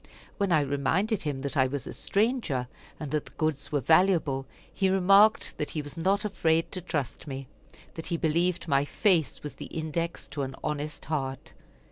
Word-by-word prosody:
When 200 Hz, -2 st, +1 dB
I 155 Hz, -3 st, +5 dB
reminded 160 Hz, -, 0 dB
him 145 Hz, -3 st, -3 dB
that 140 Hz, +1 st, -4 dB
I 130 Hz, -2 st, +4 dB
was 140 Hz, -1 st, -4 dB
a -, -, -6 dB
stranger, 200 Hz, -, 0 dB, 0.3 s
and 150 Hz, -3 st, -5 dB
that 150 Hz, -1 st, -1 dB
the -, -, -14 dB
goods 155 Hz, -3 st, -1 dB
were 145 Hz, -2 st, +1 dB
valuable, 160 Hz, -4 st, +3 dB, 0.3 s
he 190 Hz, -1 st, +2 dB
remarked 195 Hz, +3 st, +4 dB
that 150 Hz, -, -1 dB
he 155 Hz, -, -3 dB
was 145 Hz, -, -8 dB
not 195 Hz, +5 st, +1 dB
afraid 165 Hz, -5 st, +1 dB
to 185 Hz, -, -4 dB
trust 145 Hz, -5 st, -3 dB
me 135 Hz, -1 st, -6 dB, 0.5 s
that 165 Hz, -, -6 dB
he 170 Hz, -, -1 dB
believed 170 Hz, +3 st, +1 dB
my 140 Hz, -2 st, +3 dB
face 170 Hz, 0 st, +1 dB
was 150 Hz, -, -5 dB
the -, -, -6 dB
index 160 Hz, -1 st, -3 dB
to 140 Hz, 0 st, -4 dB
an 135 Hz, -1 st, -4 dB
honest 150 Hz, 0 st, -3 dB
heart. 135 Hz, -4 st, -3 dB
155 Hz, 185 wpm, -28 LUFS, 140-180 Hz, 0.5 s, I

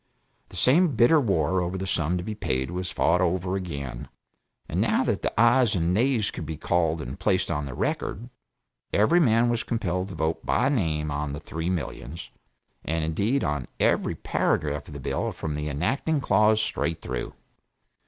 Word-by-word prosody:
The -, -, -12 dB
same 140 Hz, -, +4 dB
bitter 120 Hz, +8 st, +5 dB
war 95 Hz, -, +1 dB
over 90 Hz, +2 st, -2 dB
the 95 Hz, -, -3 dB
sum 90 Hz, -1 st, 0 dB
to 85 Hz, -, -4 dB
be 110 Hz, -, -4 dB
paid 65 Hz, -9 st, -2 dB
was 90 Hz, 0 st, -3 dB
fought 90 Hz, +2 st, +2 dB
over 90 Hz, +1 st, 0 dB
again, 70 Hz, -10 st, -5 dB, 0.6 s
and -, -, -1 dB
now -, -, +2 dB
that -, -, -1 dB
the -, -, -1 dB
ayes 120 Hz, -1 st, +5 dB
and 85 Hz, 0 st, +1 dB
nays 115 Hz, 0 st, +2 dB
could -, -, -6 dB
be 80 Hz, -1 st, -4 dB
called 80 Hz, 0 st, 0 dB
and -, -, -7 dB
placed -, -, +1 dB
on 75 Hz, -1 st, -2 dB
record, 100 Hz, -, -3 dB, 0.6 s
every 110 Hz, +13 st, +4 dB
man 120 Hz, -6 st, +4 dB
was 120 Hz, -1 st, +1 dB
compelled 95 Hz, -5 st, -2 dB
to 95 Hz, -, -8 dB
vote 80 Hz, 0 st, -1 dB
by 125 Hz, +3 st, +2 dB
name 80 Hz, -, 0 dB
on 70 Hz, 0 st, -2 dB
the 75 Hz, -, -5 dB
three 80 Hz, +2 st, -4 dB
millions, 80 Hz, -2 st, -5 dB, 0.5 s
and 80 Hz, 0 st, -1 dB
indeed 100 Hz, -, 0 dB
on 75 Hz, -3 st, -2 dB
every -, -, +2 dB
paragraph 75 Hz, -1 st, -1 dB
of 75 Hz, -, -10 dB
the -, -, -6 dB
bill -, -, -2 dB
from 80 Hz, -, -4 dB
the 75 Hz, +1 st, -3 dB
enacting 135 Hz, -, 0 dB
clause 105 Hz, -2 st, +3 dB
straight 80 Hz, -6 st, -1 dB
through. -, -, -5 dB
90 Hz, 180 wpm, -26 LUFS, 75-110 Hz, 0.6 s, bitter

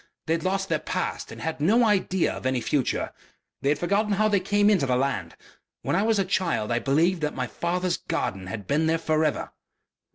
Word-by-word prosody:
They 160 Hz, -, +1 dB
had 165 Hz, -1 st, -1 dB
lost 190 Hz, +1 st, 0 dB
their -, -, 0 dB
past -, -, -3 dB
and -, -, -9 dB
had 160 Hz, -2 st, -3 dB
no 220 Hz, +10 st, +4 dB
idea 190 Hz, -3 st, +1 dB
of -, -, -4 dB
any 130 Hz, -1 st, +1 dB
future.... 130 Hz, +3 st, -1 dB, 0.5 s
They 140 Hz, -, +1 dB
had 145 Hz, -, +2 dB
forgotten 200 Hz, +6 st, +1 dB
how 215 Hz, +2 st, +2 dB
they 200 Hz, -2 st, +3 dB
came 205 Hz, +2 st, +2 dB
into 190 Hz, -10 st, +3 dB
the 125 Hz, -, +2 dB
land... 125 Hz, -10 st, -1 dB, 0.5 s
When -, -, 0 dB
I 195 Hz, -, +3 dB
was 220 Hz, 0 st, +2 dB
a 195 Hz, -, +1 dB
child 120 Hz, -, 0 dB
I 120 Hz, -, +2 dB
believed 165 Hz, +7 st, +2 dB
that 150 Hz, 0 st, -1 dB
my 130 Hz, -, -1 dB
father's 175 Hz, -, -1 dB
garden 95 Hz, -, -3 dB
had 105 Hz, 0 st, -6 dB
been 155 Hz, +3 st, +1 dB
there 165 Hz, +1 st, +2 dB
for 155 Hz, -1 st, +1 dB
ever.... 150 Hz, -, -1 dB
165 Hz, 220 wpm, -25 LUFS, 135-190 Hz, 0.5 s, no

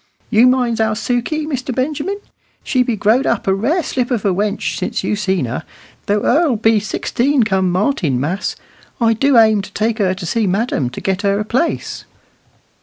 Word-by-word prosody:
You 235 Hz, +2 st, +6 dB
minds 245 Hz, -3 st, +2 dB
our 220 Hz, -1 st, +1 dB
Sukey, 245 Hz, +7 st, -1 dB
Mr. 260 Hz, -4 st, -3 dB
Benjamin; 300 Hz, +9 st, -2 dB, 0.4 s
she 255 Hz, -, +1 dB
be 245 Hz, -2 st, 0 dB
growed 220 Hz, +6 st, +2 dB
a 230 Hz, -, +2 dB
rare 275 Hz, -, 0 dB
slip 250 Hz, -4 st, -2 dB
of 235 Hz, -6 st, -1 dB
a 195 Hz, -, +3 dB
wench 205 Hz, +2 st, -1 dB
since -, -, -2 dB
you -, -, 0 dB
seen 190 Hz, -7 st, 0 dB
her, 120 Hz, +2 st, -4 dB, 0.4 s
though 205 Hz, +1 st, +1 dB
her'll 295 Hz, -1 st, +3 dB
be 225 Hz, 0 st, +3 dB
sixteen 245 Hz, +5 st, 0 dB
come 190 Hz, -4 st, +1 dB
Martinmas. 180 Hz, -, -1 dB, 0.4 s
I 230 Hz, -1 st, +3 dB
do 270 Hz, +3 st, +3 dB
aim 220 Hz, -2 st, +5 dB
to 195 Hz, -, -10 dB
take 220 Hz, +1 st, -1 dB
her 185 Hz, -2 st, +1 dB
to 185 Hz, -2 st, -7 dB
see 220 Hz, +4 st, 0 dB
madam 190 Hz, -, 0 dB
to 125 Hz, -, -8 dB
get 190 Hz, 0 st, -1 dB
her 200 Hz, -1 st, +1 dB
a 210 Hz, -, -2 dB
place." 255 Hz, +10 st, -2 dB
220 Hz, 180 wpm, -17 LUFS, 200-255 Hz, 0.4 s, You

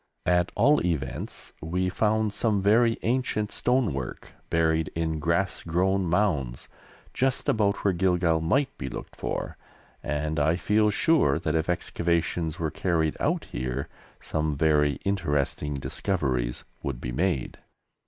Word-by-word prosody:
At 90 Hz, 0 st, +2 dB
all 145 Hz, +1 st, +4 dB
events 80 Hz, -7 st, -3 dB
we 90 Hz, +4 st, -1 dB
found 110 Hz, +2 st, +1 dB
some 105 Hz, -1 st, +1 dB
very 115 Hz, +4 st, +4 dB
ancient 115 Hz, -3 st, 0 dB
stonework 110 Hz, -, -1 dB, 0.2 s
buried 80 Hz, -1 st, +2 dB
in 80 Hz, -1 st, -1 dB
grass 85 Hz, +5 st, 0 dB
grown 95 Hz, +3 st, +1 dB
mounds 80 Hz, -10 st, 0 dB, 0.5 s
just 135 Hz, +1 st, 0 dB
about 105 Hz, -2 st, +1 dB
where 100 Hz, -, +4 dB
Gilgal 85 Hz, -2 st, +2 dB
might 135 Hz, -, +1 dB
be 65 Hz, -, -4 dB
looked -, -, -8 dB
for, -, -, -4 dB, 0.4 s
and 75 Hz, +1 st, -2 dB
I 80 Hz, +3 st, +3 dB
feel 105 Hz, +4 st, +2 dB
sure 105 Hz, -, +3 dB
that 80 Hz, -3 st, -2 dB
if 80 Hz, +1 st, 0 dB
excavations 85 Hz, -1 st, -1 dB
were 80 Hz, -2 st, -2 dB
carried 80 Hz, -4 st, 0 dB
out -, -, 0 dB
here 65 Hz, +2 st, -3 dB, 0.3 s
some 75 Hz, -2 st, -2 dB
very 75 Hz, -1 st, +3 dB
interesting 75 Hz, -6 st, 0 dB
discoveries 65 Hz, -6 st, -1 dB, 0.2 s
would 70 Hz, -3 st, -4 dB
be 60 Hz, -, -4 dB
made. 80 Hz, 0 st, -1 dB
85 Hz, 135 wpm, -27 LUFS, 75-100 Hz, 0.5 s, all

